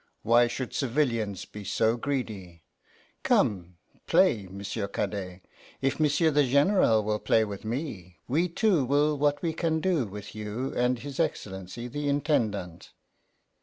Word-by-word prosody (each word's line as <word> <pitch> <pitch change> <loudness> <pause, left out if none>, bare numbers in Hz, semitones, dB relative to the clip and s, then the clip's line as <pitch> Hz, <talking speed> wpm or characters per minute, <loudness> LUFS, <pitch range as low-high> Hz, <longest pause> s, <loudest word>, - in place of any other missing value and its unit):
Why 120 +1 +5
should 125 +1 -5
civilians 115 -7 -1
be 105 - -10
so 110 +4 +1
greedy? 110 - -4 0.6
Come, 90 -3 +1 0.3
play, 100 -4 +3
M'sieu' 100 +1 -4
Cadet. 95 -3 -4 0.4
If 135 +2 -1
M'sieu' 155 +2 +3
the 145 0 +4
General 140 - +3
will 105 0 -1
play 110 +1 +3
with 100 -2 -7
me, 110 - -5
we 165 +8 +1
two 175 -3 +2
will 145 +3 +2
what 145 0 +1
we 165 -2 0
can 160 -1 0
do 165 - +1
with 100 +1 -9
you 110 +5 -4
and 125 +1 +1
his 140 +3 -8
Excellency 95 +4 -3
the 145 +3 -3
Intendant. 110 - -1
120 Hz, 140 wpm, -27 LUFS, 100-145 Hz, 0.6 s, Why